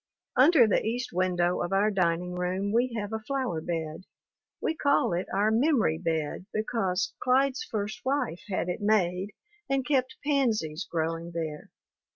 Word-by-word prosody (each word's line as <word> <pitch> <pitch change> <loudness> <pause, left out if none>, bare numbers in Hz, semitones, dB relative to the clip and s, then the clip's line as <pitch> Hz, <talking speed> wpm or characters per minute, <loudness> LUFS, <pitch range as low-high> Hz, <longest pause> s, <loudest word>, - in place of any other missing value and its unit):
Under 270 -1 +7
the 210 - +2
east 245 +1 -2
window 180 -1 +1
of 175 - -2
our 200 +2 +3
dining 180 -2 0
room 185 +3 -1
we 240 +1 +1
have 205 +1 -5
a 220 - -1
flower 245 - -2
bed. 160 +1 -4 0.5
We - - 0
call 285 - +2
it 175 +2 -2
our 205 +3 +2
memory 230 - +2
bed 165 +1 -2
because 215 -3 -1
Clyde's 260 +1 +2
first 210 -1 -4
wife 260 - -1
had 185 -2 -1
it 180 +4 -3
made 200 -2 +1 0.3
and 270 -1 +1
kept 260 -2 0
pansies 215 - 0
growing 165 +1 -2
there. 155 -2 -4
200 Hz, 155 wpm, -28 LUFS, 175-250 Hz, 0.5 s, Under